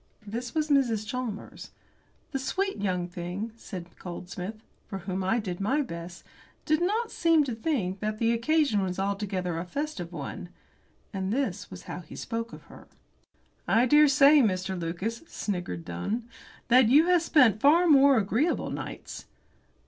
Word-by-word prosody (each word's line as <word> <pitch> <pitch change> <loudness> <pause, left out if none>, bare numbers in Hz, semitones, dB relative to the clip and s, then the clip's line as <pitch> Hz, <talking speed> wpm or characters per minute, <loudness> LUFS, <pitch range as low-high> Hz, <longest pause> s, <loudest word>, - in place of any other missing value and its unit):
This 235 +5 -5
was 310 -1 0
Mrs. 235 -7 +2
Chalmers. 235 -2 -5 0.6
"The 270 - -2
sweet 390 +9 -1
young 180 -3 -1
thing," 180 +5 -5
said 180 -6 -9
Goldsmith, 180 +4 -7 0.2
"for 195 - -5
whom 190 0 -4
I 190 +5 +1
did 185 -5 -4
my 265 +9 +1
best, 170 -5 -8 0.4
did 310 +2 +2
not 435 +6 0
seem 330 -3 +3
to 260 -4 -3
think 220 - -2
that 215 0 -2
the 230 +1 +2
occasion 235 -2 +2
was 185 -1 -2
altogether 195 -3 -2
a - - -3
festive 280 - -4
one," 165 +2 -6 0.6
and 190 0 -2
this 215 -6 -2
was 185 -1 -10
how - - -6
he 175 - -11
spoke 230 0 -4
of - - -11
her. - - -15 0.8
"I 230 +3 +4
dare 295 +4 +6
say, 285 +1 +6
Mr. 190 -4 0
Lucas," 180 +6 -3
sniggered 175 - -4
Dunn, 205 - -3 0.4
"that 245 -1 +6
you 295 +6 +6
have 355 -1 +4
spent 255 - +4
far 325 +5 +5
more 280 -4 +6
agreeable 225 - 0
nights." - - -7
220 Hz, 155 wpm, -28 LUFS, 185-280 Hz, 0.8 s, dare